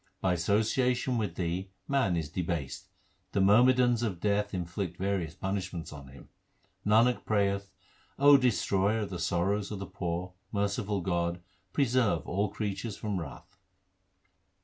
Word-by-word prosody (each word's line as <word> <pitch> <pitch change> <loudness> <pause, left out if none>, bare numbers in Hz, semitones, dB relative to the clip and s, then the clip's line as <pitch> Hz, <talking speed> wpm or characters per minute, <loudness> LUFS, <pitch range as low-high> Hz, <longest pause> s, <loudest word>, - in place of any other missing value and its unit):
By 95 - +1
association 115 +7 +1
with 100 -6 -2
thee 90 +2 -2 0.2
man 130 -11 +2
is 80 -3 -2
debased: 85 -6 -3 0.5
the 100 - +1
myrmidons 120 +4 +5
of 100 -7 -2
Death 105 +1 +1
inflict 90 0 -4
various 95 -4 -1
punishments 95 -4 -4
on 70 -2 -10
him. 65 0 -14 0.5
Nanak 115 +4 +4
prayeth, 100 -2 0 0.5
O 145 +1 +8
Destroyer 110 -4 +2
of 100 - -4
the 90 - -4
sorrows 95 +4 0
of 105 - -4
the 100 - -5
poor, 90 -1 -4 0.2
merciful 100 -1 -1
God, 85 -1 -1 0.3
preserve 120 - +2
all 100 +4 0
creatures 105 0 -4
from 105 -3 -2
wrath. 85 +6 -10
100 Hz, 135 wpm, -30 LUFS, 90-110 Hz, 0.5 s, O